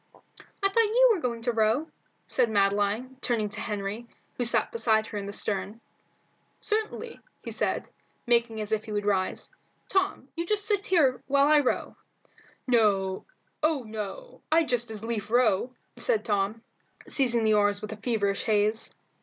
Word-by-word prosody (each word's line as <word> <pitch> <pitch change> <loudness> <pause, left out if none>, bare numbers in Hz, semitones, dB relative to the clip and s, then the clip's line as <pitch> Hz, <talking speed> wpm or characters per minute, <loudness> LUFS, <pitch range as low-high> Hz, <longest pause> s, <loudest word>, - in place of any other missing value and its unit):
"I 395 - +5
thought 460 +4 +4
you - - +7
were 375 - -3
going 235 -3 -3
to 240 - +1
row?" 225 +7 +1 0.4
said 250 -3 +1
Madeline, 205 +5 +1
turning 220 -4 0
to 210 +1 -5
Henry, 210 +2 -4 0.3
who 245 - -2
sat 235 - +2
beside 220 - +2
her 215 - -6
in 200 - -6
the - - -4
stern. 205 +1 -3 0.8
"Certainly," 440 +2 -3 0.3
said - - 0
he, - - -29 0.3
making 235 -2 +2
as 210 0 -5
if 220 -1 0
he 220 - -8
would 205 -1 -2
rise. 195 - 0 0.4
"Tom, 380 -8 0
you 335 - -2
just 415 0 0
sit 405 -2 +1
here 290 -9 +3
while 280 0 +4
I 300 0 +6
row." 275 - -1 0.8
"Oh 225 - 0
no, 220 - -7
I'd 320 0 +3
just 240 -1 0
as 220 -1 -6
lief 225 -3 -3
row," 235 -1 +2 0.3
said 465 -4 +1
Tom, 205 +1 -1 0.4
seizing 240 -4 +1
the 215 0 +4
oars 205 -1 +3
with 215 0 -7
feverish 205 -5 0
haste. 215 0 +1
230 Hz, 160 wpm, -27 LUFS, 210-280 Hz, 0.8 s, you